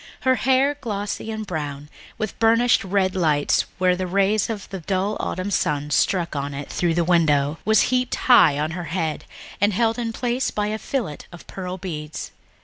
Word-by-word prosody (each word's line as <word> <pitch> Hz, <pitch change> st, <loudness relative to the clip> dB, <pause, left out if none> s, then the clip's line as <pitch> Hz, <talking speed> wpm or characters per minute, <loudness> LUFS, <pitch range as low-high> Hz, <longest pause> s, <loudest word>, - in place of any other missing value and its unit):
Her 260 Hz, -, +3 dB
hair, 265 Hz, +2 st, +2 dB
glossy 210 Hz, -2 st, -4 dB
and 220 Hz, -1 st, -4 dB
brown, 150 Hz, -5 st, -5 dB, 0.3 s
with 215 Hz, -2 st, -4 dB
burnished 230 Hz, +2 st, +4 dB
red 190 Hz, -1 st, 0 dB
lights 155 Hz, -5 st, +2 dB
where 180 Hz, -1 st, +3 dB
the 185 Hz, 0 st, -3 dB
rays 200 Hz, +4 st, +2 dB
of 210 Hz, -4 st, -5 dB
the 195 Hz, -, -5 dB
dull 190 Hz, +4 st, -1 dB
autumn 185 Hz, +3 st, -3 dB
sun 150 Hz, -5 st, 0 dB
struck 170 Hz, +2 st, +1 dB
on 140 Hz, 0 st, -3 dB
it 140 Hz, 0 st, -6 dB
through 170 Hz, -2 st, 0 dB
the 170 Hz, -, +2 dB
window, 155 Hz, -3 st, +2 dB
was 220 Hz, 0 st, +5 dB
heaped 250 Hz, 0 st, +1 dB
high 235 Hz, -, +5 dB
on 155 Hz, +2 st, -1 dB
her 175 Hz, 0 st, -5 dB
head 160 Hz, -3 st, -3 dB, 0.4 s
and 205 Hz, 0 st, +3 dB
held 230 Hz, +3 st, +1 dB
in 230 Hz, -1 st, -2 dB
place 245 Hz, +2 st, -1 dB
by 210 Hz, 0 st, -2 dB
a 215 Hz, +1 st, -3 dB
fillet 225 Hz, -, -3 dB
of 175 Hz, -, -12 dB
pearl 185 Hz, -1 st, -6 dB
beads. 155 Hz, -5 st, -6 dB
185 Hz, 185 wpm, -23 LUFS, 160-220 Hz, 0.4 s, was